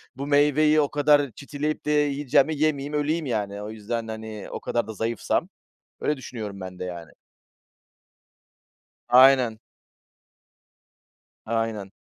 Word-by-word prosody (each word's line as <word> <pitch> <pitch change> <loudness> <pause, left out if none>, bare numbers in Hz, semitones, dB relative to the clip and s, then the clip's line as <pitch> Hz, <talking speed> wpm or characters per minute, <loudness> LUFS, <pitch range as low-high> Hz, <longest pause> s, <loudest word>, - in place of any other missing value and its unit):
bu 140 +1 -5
meyveyi 150 +1 +4
o 145 - 0
kadar 145 -2 +3
çitileyip 150 +2 -4
de 150 - 0
yiyeceğime 145 0 +2
yemeyeyim, 145 -1 0
öleyim 150 +2 0
yani. 105 -5 -3
O 105 - -6
yüzden, 110 +1 -4
hani, 110 -2 -7
o - - -5
kadar 120 -2 -2
da 110 - -6
zayıfsam. 115 +1 -1 0.5
Öyle 150 - 0
düşünüyorum 110 -6 -7
ben 95 -1 -8
de, - - -4
yani. 85 -3 -7 2.0
Aynen. 125 -3 +6 1.9
Aynen. 110 -3 -2
130 Hz, 120 wpm, -25 LUFS, 110-145 Hz, 2.0 s, Aynen